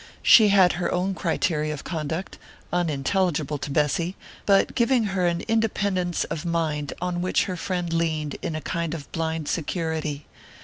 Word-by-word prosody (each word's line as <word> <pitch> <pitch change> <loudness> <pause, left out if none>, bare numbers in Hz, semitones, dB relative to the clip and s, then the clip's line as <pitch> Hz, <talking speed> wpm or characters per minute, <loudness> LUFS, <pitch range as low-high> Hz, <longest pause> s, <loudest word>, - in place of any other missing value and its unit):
She 220 -2 +8
had 195 -3 +5
her 175 - -1
own 185 +2 0
criteria 155 -4 0
of 140 - -9
conduct, 160 +2 -4 0.3
unintelligible 155 -2 0
to 145 - -5
Bessy, 150 +5 0 0.3
but 195 -1 +4
giving 240 0 +3
her 180 -2 +2
an 170 0 0
independence 200 -5 0
of 155 - -4
mind 160 -4 -1
on 180 0 -2
which 185 - +2
her 185 - -3
friend 175 -1 -2
leaned 155 -3 -1
in 160 - -3
a 155 - -3
kind 170 -1 -2
of 145 -3 -9
blind 160 -2 -2
security. 160 -3 -2
170 Hz, 160 wpm, -25 LUFS, 155-185 Hz, 0.3 s, She